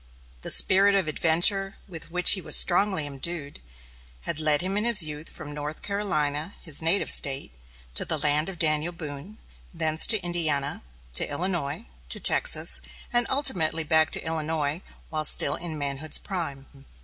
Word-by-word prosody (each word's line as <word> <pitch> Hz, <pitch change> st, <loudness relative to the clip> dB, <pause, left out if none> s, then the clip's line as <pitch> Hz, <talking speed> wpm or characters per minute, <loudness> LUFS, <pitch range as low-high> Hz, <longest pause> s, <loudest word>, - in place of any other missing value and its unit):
The -, -, -4 dB
spirit 200 Hz, +1 st, +5 dB
of 190 Hz, -5 st, 0 dB
adventure, 175 Hz, +6 st, +2 dB
with 165 Hz, -4 st, -10 dB
which 180 Hz, +1 st, +7 dB
he 190 Hz, -, +5 dB
was -, -, +2 dB
strongly 190 Hz, -3 st, +3 dB
imbued, 145 Hz, -, -5 dB, 0.6 s
had 145 Hz, -, -4 dB
led 155 Hz, -1 st, 0 dB
him 190 Hz, +2 st, -3 dB
in 210 Hz, -, -1 dB
his 230 Hz, -6 st, +4 dB
youth 150 Hz, 0 st, -6 dB
from 150 Hz, -3 st, -8 dB
North 150 Hz, +1 st, -8 dB
Carolina, 160 Hz, -5 st, -3 dB
his 155 Hz, -3 st, +3 dB
native 165 Hz, +5 st, 0 dB
State, 135 Hz, -, +1 dB, 0.4 s
to -, -, +4 dB
the 160 Hz, -, -3 dB
land 150 Hz, +3 st, 0 dB
of 190 Hz, -, -9 dB
Daniel 155 Hz, +1 st, 0 dB
Boone, 160 Hz, +5 st, -10 dB, 0.4 s
thence 160 Hz, -1 st, +3 dB
to 220 Hz, -, +5 dB
Indiana, 155 Hz, -5 st, -1 dB, 0.3 s
to -, -, -1 dB
Illinois, 165 Hz, +2 st, -4 dB, 0.2 s
to -, -, 0 dB
Texas, -, -, +2 dB, 0.3 s
and 240 Hz, -1 st, +2 dB
ultimately 165 Hz, -, -1 dB
back 160 Hz, 0 st, +3 dB
to -, -, -1 dB
Illinois, 160 Hz, 0 st, -4 dB, 0.3 s
while 155 Hz, -1 st, -3 dB
still 145 Hz, -1 st, +5 dB
in 165 Hz, -2 st, -6 dB
manhood's 145 Hz, +1 st, -2 dB
prime. 160 Hz, -8 st, -6 dB
160 Hz, 160 wpm, -24 LUFS, 150-185 Hz, 0.6 s, which